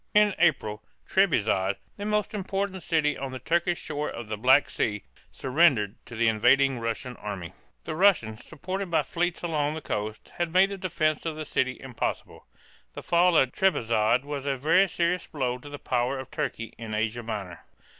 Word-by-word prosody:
In 210 -1 +5
April, 110 -11 +2 0.3
Treb´izond, 105 - +2 0.2
the 205 - -6
most 210 -1 0
important 195 -1 -2
city 155 -4 +1
on 135 0 -5
the 130 - -5
Turkish 170 +4 0
shore 150 0 -3
of 115 -2 -7
the 110 - -2
Black 130 +6 +5
Sea, 105 -2 -2 0.3
surrendered 130 -7 +3
to 120 - -9
the 115 0 +2
invading 130 +4 +4
Russian 115 +2 -4
army. 95 -5 -6 0.3
The - - -4
Russians, 155 - +3
supported 190 +4 -5
by 165 - +2
fleets 175 0 -2
along 155 -3 0
the - - -4
coast, 105 -3 -4
had 175 -1 0
made 190 +3 +4
the 200 - -4
defense 155 -5 0
of 160 - -3
the 155 0 -5
city 130 -2 -1
impossible. 130 -3 -5 0.5
The - - -8
fall 175 0 +4
of 130 -3 +4
Trebizond 120 - +2
was 145 -1 -5
a 135 -1 0
very 165 +8 +4
serious 175 +1 0
blow 125 -5 -2
to 145 - -11
the 145 - -7
power 125 0 -1
of 130 0 -8
Turkey 115 -7 -4
in 110 -2 -5
Asia 110 +2 -1
Minor. 100 -6 -6
140 Hz, 180 wpm, -27 LUFS, 115-175 Hz, 0.5 s, In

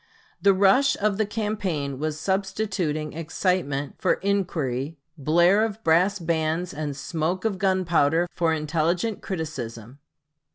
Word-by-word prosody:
The 200 -1 +5
rush 200 +9 +4
of 210 0 0
the 215 - +2
campaign 195 - -2
was 155 0 -2
substituting 190 -5 -1
excitement 160 -3 -1
for - - +3
inquiry, 165 -8 -1 0.2
blare 175 +7 +4
of 220 0 -3
brass 180 +5 +3
bands 165 0 -1
and 145 -2 -4
smoke 170 +6 -2
of 200 -4 0
gunpowder 175 -4 +2
for 170 -2 +1
intelligent 165 +7 0
criticism. 130 - -6
170 Hz, 120 wpm, -25 LUFS, 155-195 Hz, 0.2 s, The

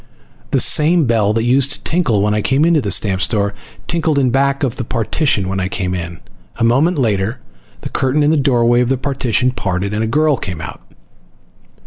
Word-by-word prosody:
The - - +1
same 160 +1 +4
bell 110 -4 +1
that 115 0 0
used 135 +3 +2
to - - -3
tinkle 135 - +1
when 105 0 +1
I 105 - 0
came 135 +7 +1
into 165 -3 +3
the 105 - -3
stamp 95 0 +1
store 100 0 0 0.3
tinkled 160 -3 -1
in 130 -3 +2
back 140 +2 0
of 125 -2 -2
the 125 - -3
partition 115 - -1
when 95 0 -3
I 95 - -1
came 95 -2 -3
in. 85 -2 -6 0.3
A 115 - -3
moment 140 +9 +2
later 110 -3 -1 0.4
the - - -6
curtain 130 +3 0
in 150 - +3
the - - +2
doorway 120 -3 +2
of 125 - 0
the 135 - +1
partition 125 -2 -1
parted, 100 -3 -3
and 110 +1 -1
a - - -1
girl 150 +3 +1
came 90 -5 -6
out. 80 - -8
120 Hz, 205 wpm, -16 LUFS, 100-140 Hz, 0.4 s, same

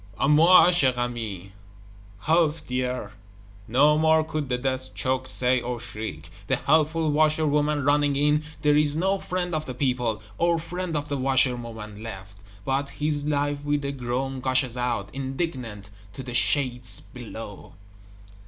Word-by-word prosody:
"À 135 - +2
moi, 165 +5 +7
chère 135 -8 +3
amie 110 -6 -4 0.7
(Help, 160 - +1
dear)!" 125 -4 -3 0.6
no 145 +6 +4
more 160 0 +4
could 155 -3 -4
the 125 - 0
Death 130 0 -3
choked 130 0 -1
say 125 0 +1
or 120 0 -4
shriek. 105 -9 -7 0.2
The - - +2
helpful 160 0 +2
Washer 155 +1 +2
woman 150 -1 +1
running 145 0 +3
in 150 +2 +2 0.2
there 150 0 +4
is 150 -1 +3
no 190 +4 +1
Friend 180 -1 -3
of 155 0 -2
the 130 - -5
People, 125 -5 -1 0.2
or 170 0 +3
Friend 170 0 -4
of 145 0 -3
the 140 - -2
Washer 130 -1 +3
woman, 110 -3 -8
left; 100 -3 -9 0.3
but 135 +1 -1
his 145 0 -2
life 145 -1 -1
with 145 -1 -1
a 140 - -1
groan 130 0 -3
gushes 130 -1 +1
out, 120 -5 -2
indignant, 130 - -4 0.2
to 130 - -7
the 125 -1 -6
shades 125 -4 +2
below! 115 -5 -10
135 Hz, 155 wpm, -25 LUFS, 120-150 Hz, 0.7 s, moi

